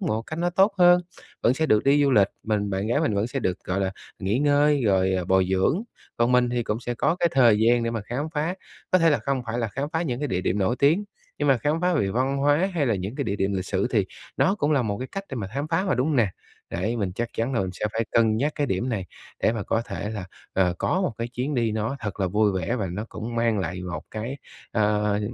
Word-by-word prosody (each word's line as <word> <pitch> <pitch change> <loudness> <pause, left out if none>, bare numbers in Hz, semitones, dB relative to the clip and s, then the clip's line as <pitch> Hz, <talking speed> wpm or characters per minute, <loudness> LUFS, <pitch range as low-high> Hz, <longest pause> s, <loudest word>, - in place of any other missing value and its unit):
một 115 - -1
cách 155 +7 -7
nó 175 +1 +1
tốt 195 +4 +4
hơn. 175 0 +7 0.4
Vẫn 120 - +4
sẽ 160 +3 0
được 105 -6 +3
đi 145 +1 +4
du 140 - +3
lịch, 100 -6 +5
mình 105 -2 -1
bạn 95 +2 -1
gái 120 +6 +1
mình 150 -10 +1
vẫn 100 +2 +1
sẽ 130 +3 -3
được, 95 -6 -1
gọi 95 +2 -1
là, 95 -1 0 0.3
nghỉ 100 +5 0
ngơi 145 0 +3
rồi, 95 -2 +3
ờ, 90 -1 0
bồi 95 0 +3
dưỡng, 95 - +2 0.3
còn 120 +1 +2
mình 125 -1 +4
thì 120 -1 0
cũng 110 +1 -2
sẽ 120 0 -3
có 165 - +1
cái 175 -2 +2
thời 120 -5 +5
gian 120 +2 +4
để 115 - -1
mà 115 -1 -2
khám 125 +7 -3
phá. 155 +5 0 0.4
Có 185 - +5
thể 165 -1 +4
là 145 - +3
không 135 -2 -2
phải 115 +2 -2
là 115 - -1
khám 135 +7 -3
phá 160 - 0
những 125 -8 -2
cái 145 - 0
địa 90 -6 -1
điểm 95 +2 0
nổi 100 +6 +1
tiếng, 160 +10 +3 0.3
nhưng 145 -1 +1
mà 135 - +5
khám 150 +7 0
phá 180 0 +2
về 120 -11 +1
văn 130 +4 0
hóa 145 +7 +2
hay 145 -5 +1
là 115 - +2
những 95 +4 -4
cái 140 -1 -2
địa 100 - -2
điểm 95 +1 0
lịch 95 -1 -2
sử - - 0
thì - - +2 0.3
nó 190 - +3
cũng 150 -7 0
là 140 - +3
một 100 -3 -2
cái 130 - -5
cách 195 0 -4
để 135 - -4
mà 100 -4 -3
khám 140 +2 -2
phá 185 - +1
mà, 160 - +1
đúng 125 +2 +1
hông 150 - +1
nè? 115 -5 +4 0.4
Đấy, 105 +8 -2
mình 100 -5 -2
chắc 120 +3 -2
chắn 115 +4 -1
là 115 - +2
mình 95 -1 -2
sẽ 100 - -5
phải 115 +1 0
cân 110 -2 +3
nhắc 145 +6 0
cái 145 - 0
điểm 95 +4 -1
này, 105 -6 -2 0.4
để - - +3
mà 110 -3 -3
có 115 +3 0
thể 105 - -4
là, 105 -4 -5 0.3
ờ, 90 -2 +2
có 185 - +1
một 180 - 0
cái 115 +1 -2
chuyến 130 +4 -3
đi 115 -4 +1
nó 110 +5 -2
thật 105 -2 -5
là 95 - +2
vui 105 +2 +2
vẻ 95 +4 -1
và 100 -5 -2
nó 105 +4 -4
cũng 115 +2 -6
mang 115 -2 +1
lại 90 0 -3
một 85 -3 -5
cái, 115 +6 -4 0.4
ờ, 105 -1 +1
115 Hz, 285 wpm, -25 LUFS, 100-145 Hz, 0.4 s, hơn